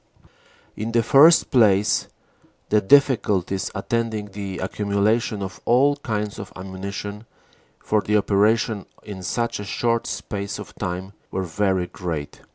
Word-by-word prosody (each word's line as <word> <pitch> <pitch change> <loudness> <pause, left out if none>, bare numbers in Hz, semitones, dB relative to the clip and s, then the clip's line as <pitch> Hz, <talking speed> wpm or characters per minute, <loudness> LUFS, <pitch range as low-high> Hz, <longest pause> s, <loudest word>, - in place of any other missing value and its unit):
In 110 +2 -4
the 115 -1 +3
first 150 +8 +6
place, 105 -4 +3 0.6
the 105 0 +3
difficulties 105 -7 +3
attending 110 0 -2
the 100 -2 -5
accumulation 100 +2 0
of 95 -1 -7
all 135 +4 +4
kinds 105 -6 -3
of - - -8
ammunition 100 +3 -6 0.5
for 105 -1 0
the 105 +1 +1
operation 105 +1 +1 0.2
in 100 -3 -8
such 115 +6 -2
a - - -4
short 115 +3 -1
space 100 -1 -4
of - - -9
time 95 +2 -5 0.2
were 95 - -2
very 95 +1 0
great. 85 -5 -6
105 Hz, 130 wpm, -23 LUFS, 95-115 Hz, 0.6 s, first